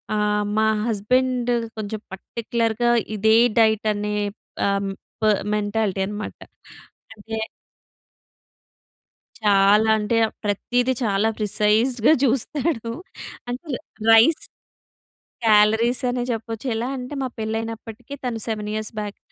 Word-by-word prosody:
ఆహ్, 210 0 +1
మా 220 - +4 0.2
హస్బెండ్ 245 +3 +1 0.3
కొంచెం 215 0 -4
పర్టిక్యులర్‌గా 230 +3 -1 0.3
ఇదే 220 +2 +4 0.2
డైట్ 220 -1 +3
అనే 210 0 -2 0.5
ఆహ్, 200 0 0 0.3
ప - - -6 0.3
మెంటాలిటీ 205 -2 -1
అనమాట. 210 0 -5 0.8
అంటే 220 +1 -7 2.1
చాలా 205 +1 +5
అంటే 215 +2 0 0.3
ప్రత్తీది 245 +5 +1
చాలా 210 0 +2
ప్రిసైజ్డ్‌గా 220 +5 +2
చూస్తాడు. 260 0 0 0.6
అంటే 255 +6 -5 0.4
రైస్ 225 +8 +7 1.1
క్యాలరీస్ 220 +4 +4
అనే 245 0 -1
చెప్పొచ్చు. 225 +2 -5
ఎలా 230 +3 -2
అంటే 250 +2 -6
మా 260 - -1
పెళ్ళైనప్పటికీ 225 +3 -5
తను 230 -3 -2
7 210 -1 -3
ఇయర్స్ 215 +1 -3
బ్యాక్, 205 -1 -6
220 Hz, 100 wpm, -23 LUFS, 210-240 Hz, 2.1 s, రైస్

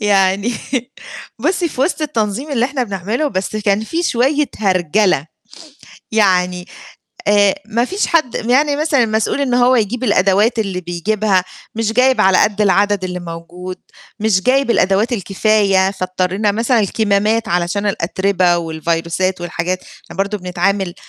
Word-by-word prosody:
يعني 200 +2 +2 0.9
بُصّي، 345 +6 0
في 260 - -7
وِسط 320 +2 0
التنظيم 255 -1 -2
اللي 245 -3 +1
إحنا 265 -1 -2
بنعمله، 215 - -2
بس 195 -1 -3
كان 205 0 +1
في 330 +9 -2
شوية 285 +1 +1
هرجلة. 185 -4 +1 0.9
يعني 180 -4 +2 0.6
آآ 205 -1 +4
ما 230 +2 0
فيش 385 +10 -1
حد 310 -8 +1
يعني 285 +5 +1
مثلًا 295 -4 +2
المسؤول 220 +5 -1
إنه 250 -3 +2
هو 255 0 +4
يجيب 235 +3 -1
الأدوات 205 +2 +2
اللي 195 -4 -2
بيجيبها، 185 +2 0 0.3
مش 225 0 -1
جايب 255 +2 +3
على 190 -1 +4
قد 210 0 +1
العدد 200 -1 +2
اللي 180 0 -4
موجود، 175 +2 -8 0.4
مش 205 -3 +2
جايب 265 +2 +2
الأدوات 200 +3 +2
الكفاية، 195 -2 +2
فاضطرينا 185 +2 -1
مثلًا 230 +3 +1
الكمامات 215 +2 +1
علشان 175 +4 -1
الأترِبة 185 -1 +1
والفيروسات 170 +3 -2
والحاجات، 175 +1 -3
إحنا - - -15
برضه 200 +2 -1
بنتعامل 180 0 -1
205 Hz, 135 wpm, -17 LUFS, 185-235 Hz, 0.9 s, آآ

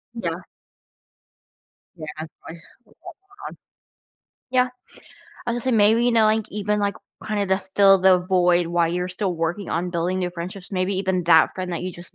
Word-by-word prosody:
Yeah. 175 -6 -4 1.5
Yeah, 160 -3 -8
I 155 - -4 0.3
hear 170 - -13 0.2
that - - -24
one. - - -10 1.4
Yeah. 255 -1 +3 0.8
I'll 235 - 0
just 240 +1 -4
say 260 - +1
maybe, 220 +2 +4
you 245 - +2
know, 225 -1 +4
like, 215 0 +2
even, 210 0 -1
like, 200 0 0 0.3
kinda 205 -2 -1
the 190 0 +1 0.2
fill 195 -1 +6
the 185 0 +5
void 180 -1 +2
while 170 0 +1
you're 180 +2 -2
still 185 0 -2
working 170 +4 -3
on 175 +2 -2
building 175 +2 -1
new 180 -1 -2
friendships, 180 +2 -8
maybe 185 +1 -1
even 190 -1 0
that 160 -2 +5
friend 185 -1 -5
that 170 - -4
you 185 0 -4
just 175 +2 -12
185 Hz, 180 wpm, -22 LUFS, 175-205 Hz, 1.5 s, fill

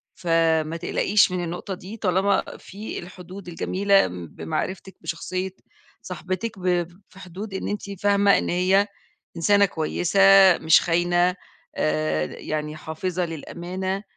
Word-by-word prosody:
فما 165 -2 +1
تقلقيش 195 +3 +2
من 180 -1 -2
النقطة 175 +3 -5
دي 190 +4 -9
طالما 195 0 +2
في 205 +3 -7
الحدود 180 +1 -10
الجميلة 195 - +2
بمعرفتك 155 - -5
بشخصية 185 +2 -4 0.5
صاحبتِك، 185 +3 -5
ب 180 -2 +1 0.2
في 190 - -16
حدود 190 +3 -8
إن 190 - -3
أنتِ 200 -2 -5
فاهمة 200 0 +4
إن - - -2
هي 190 +3 +3 0.5
إنسانة 200 +4 +4
كويسة 175 +2 -1 0.4
مش 160 0 +5
خاينة 175 +1 +2 0.4
آآ، 75 0 0
يعني 150 - -5
حافظة 170 +3 -3
للأمانة 180 +4 -5
180 Hz, 120 wpm, -24 LUFS, 165-195 Hz, 0.5 s, مش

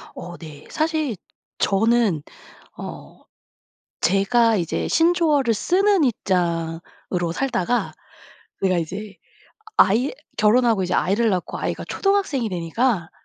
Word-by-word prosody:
어 175 -1 -8
네. 155 -3 -11
사실 310 -6 -1 0.4
저는 210 -5 +2 0.5
어 - - -9 0.8
제가 220 +5 +3
이제 170 -3 -2
신조어를 325 -7 +3
쓰는 380 - +2
입장으로 175 - -2
살다가 245 -1 -1 0.7
내가 185 -2 +2
이제 190 +5 -5 0.6
아이 240 +8 +4 0.2
결혼 225 +4 +4
하고 215 -5 +2
이제 180 - -2
아이를 215 +6 +2
낳고 185 -3 -2
아이가 - - -3
초등학생이 390 - 0
되니까 180 +2 -1
215 Hz, 235 characters per minute, -22 LUFS, 180-260 Hz, 0.8 s, 아이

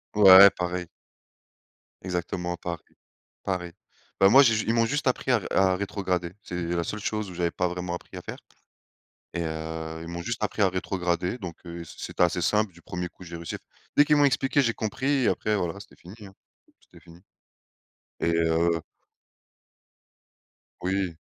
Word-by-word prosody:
Ouais, 100 -1 +10
pareil. 90 0 -3 1.2
Exactement 90 -1 -3
pareil 85 -1 -5 0.6
pareil. 90 -3 -3 0.5
Bah, 95 - +7
moi, 135 +6 +8
j'ai 115 -4 +4
ju 110 - -1
ils 115 - +2
m'ont 115 -1 +3
juste 145 +3 -1
appris 130 +1 +1
à 120 - +4
ré - - -7
à 95 -1 +3
rétrograder. 95 -3 -2
C'est 90 0 -5
la 85 0 0
seule 105 +5 -4
chose 105 -1 -3
où - - -9
j'avais 85 -1 0
pas 90 - 0
vraiment 90 0 -4
appris - - -10
à - - -6
faire - - -7 1.0
et 85 - -2
heu, 80 0 -5
ils 85 - -8
m'ont 85 0 -5
juste 110 +5 -3
appris 105 - -2
à 100 - +5
rétrograder. 90 +1 -2
Donc, 90 -8 -7
heu, 85 0 -7
c'est - - -13
c'était - - -1
assez 90 0 +1
simple 105 +1 +1
du 85 - -17
1er 90 +1 -4
coup, 90 - -15
j'ai 85 -1 -8
réussi. 85 -1 -6 0.4
Dès 145 - +7
qu'ils 150 - +4
m'ont 145 - +5
expliqué, 135 +1 +2
j'ai 115 -4 +1
compris 110 +5 -3 0.2
et - - +4
après, 105 0 +1
voilà, 90 0 -2
c'était - - -14
fini, 90 +4 -12
hein, 95 - -15 0.5
c'était - - -19
fini 85 +1 -16 1.0
et 85 - +1
heu 85 0 +2 2.0
Oui. 95 -2 -1
90 Hz, 180 wpm, -26 LUFS, 85-105 Hz, 2.0 s, Ouais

